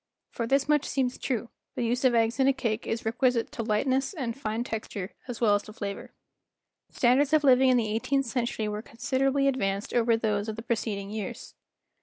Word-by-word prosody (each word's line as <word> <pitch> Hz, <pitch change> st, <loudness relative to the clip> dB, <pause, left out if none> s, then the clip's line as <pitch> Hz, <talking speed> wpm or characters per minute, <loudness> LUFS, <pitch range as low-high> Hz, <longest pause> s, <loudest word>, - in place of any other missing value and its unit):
For 230 Hz, -, -3 dB
this 275 Hz, +3 st, +2 dB
much 300 Hz, -1 st, +3 dB
seems 260 Hz, -2 st, -1 dB
true, 235 Hz, -3 st, -2 dB, 0.3 s
the -, -, -1 dB
use 245 Hz, +3 st, 0 dB
of 255 Hz, -2 st, +4 dB
eggs 230 Hz, +2 st, +2 dB
in 265 Hz, -, +4 dB
a 275 Hz, -, +5 dB
cake 225 Hz, -4 st, -2 dB
is 225 Hz, 0 st, -3 dB
requisite 235 Hz, +1 st, +1 dB
to -, -, -4 dB
lightness 260 Hz, -, 0 dB
and 240 Hz, -7 st, -3 dB
fine 225 Hz, -3 st, -3 dB
texture 215 Hz, -4 st, -5 dB, 0.2 s
as 245 Hz, -3 st, -5 dB
well 220 Hz, -4 st, +4 dB
as 205 Hz, -, +2 dB
to 215 Hz, -, -12 dB
flavor. 200 Hz, -2 st, -6 dB, 0.8 s
Standards 265 Hz, +4 st, +3 dB
of 310 Hz, -1 st, +4 dB
living 260 Hz, -1 st, +6 dB
in 255 Hz, -, +5 dB
the 225 Hz, -3 st, 0 dB
eighteenth 275 Hz, +5 st, 0 dB
century 235 Hz, -2 st, -2 dB
were 210 Hz, 0 st, -3 dB
considerably 265 Hz, +4 st, 0 dB
advanced 200 Hz, -7 st, -1 dB
over 230 Hz, -1 st, +3 dB
those 215 Hz, -1 st, -1 dB
of 215 Hz, -, -4 dB
the 225 Hz, -, -7 dB
preceding 210 Hz, -4 st, -2 dB
years. 210 Hz, -3 st, -6 dB
235 Hz, 200 wpm, -27 LUFS, 220-260 Hz, 0.8 s, living